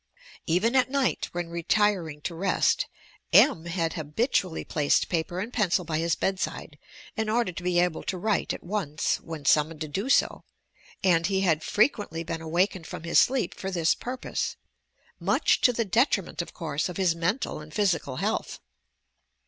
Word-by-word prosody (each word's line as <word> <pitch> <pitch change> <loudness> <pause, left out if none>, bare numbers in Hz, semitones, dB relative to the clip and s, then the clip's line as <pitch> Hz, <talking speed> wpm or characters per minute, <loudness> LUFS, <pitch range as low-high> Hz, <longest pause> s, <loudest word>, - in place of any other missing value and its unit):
Even 195 +9 +2
at 255 -1 +4
night, 275 -2 0
when 175 -1 -4
retiring 170 -3 0
to 170 - -4
rest, 180 +3 +1 0.4
M. 160 - +5
had 165 -2 -1
habitually 165 - -1
placed 145 -2 +1
paper 175 +1 -2
and 225 +6 -5
pencil 185 -5 +1
by 155 -2 -1
his 165 0 +1
bedside 185 -5 -3 0.4
in 220 0 -1
order 230 -3 +1
to 180 - -7
be 175 0 +1
able 175 -2 +1
to 185 - -3
write 210 +2 0
at - - -6
once, 175 -6 -1
when 160 -3 -8
summoned 155 +2 +3
to 155 - -2
do 195 - -3
so, - - +2 0.6
and 170 -3 +3
be 195 -1 0
had 165 -5 +2
frequently 205 - +1
been 165 0 -5
awakened 170 +2 0
from - - -7
his 170 - +4
sleep 260 -1 +2
fur 190 - -5
this 170 -3 +2
pur 250 +2 -6
pose - - -3 0.4
— - - -50 0.2
much - - +2
to 250 - +5
the 230 -1 -1
detriment, 205 - +1
of 170 - -8
course, 155 0 -3
of 180 - -6
his 185 -3 +2
mental 175 - -2
and 150 0 -11
physical 170 -8 0
health. - - -2
175 Hz, 175 wpm, -27 LUFS, 165-205 Hz, 0.6 s, M